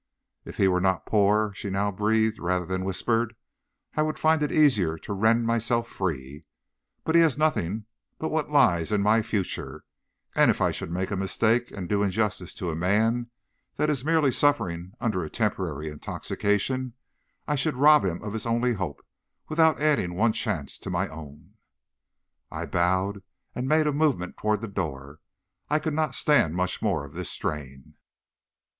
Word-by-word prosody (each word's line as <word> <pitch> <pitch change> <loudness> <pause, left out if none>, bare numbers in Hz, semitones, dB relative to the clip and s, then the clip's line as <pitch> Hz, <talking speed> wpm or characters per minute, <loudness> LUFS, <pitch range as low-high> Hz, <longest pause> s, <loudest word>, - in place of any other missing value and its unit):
"'If - - -9
he 95 - +4
were 90 -1 +2
not 95 -1 +1
poor,' 105 0 +2
she 100 - -6
now 100 +1 0
breathed 110 +2 +1
rather 90 0 -1
than 95 +2 -2
whispered, 115 +5 0 0.6
'I 155 - +2
would 155 0 -1
find 160 0 +3
it 150 - 0
easier 105 - +3
to 100 - -6
rend 110 +4 +2
myself 115 +1 +1
free. 75 - -4 0.6
But 160 - -1
he 170 - +7
has 155 -5 +3
nothing 110 - 0 0.3
but 160 - -3
what 155 -1 -1
lies 115 - +3
in 105 -1 +2
my 110 +2 +4
future, 100 -3 -3 0.5
and - - +4
if - - +2
I - - +2
should - - -5
make 95 +3 -3
a - - 0
mistake 115 +5 +1
and 90 -3 -6
do 100 +1 +1
injustice 100 -2 -1
to 90 -3 -3
a - - -4
man 110 +7 +1 0.5
that 150 0 +1
is 135 -4 -2
merely 155 -3 +3
suffering 90 -12 0
under 105 -7 -1
a 80 - -5
temporary 90 - -2
intoxication, 105 - -2 0.5
I 150 - +1
should 145 +1 0
rob 150 +3 +6
him 90 -1 -2
of 105 -1 -5
his 110 0 -3
only 120 +1 +1
hope, 95 -9 -5 0.4
without 160 -1 +3
adding 145 -13 +1
one 110 +4 +2
chance - - -3
to - - -7
my - - -1
own.' 75 -2 -12 1.0
"I - - -5
bowed, 95 +3 0 0.3
and 125 +1 -3
made 155 +2 +3
a 150 - +1
movement 140 - 0
toward 105 -1 0
the 115 - -4
door. 75 -7 -5 0.5
I 150 - +3
could 155 0 -2
not 155 -3 0
stand 115 - +3
much 90 0 -1
more - - 0
of - - -13
this - - -4
strain. 70 -3 -5
105 Hz, 175 wpm, -26 LUFS, 90-130 Hz, 1.0 s, he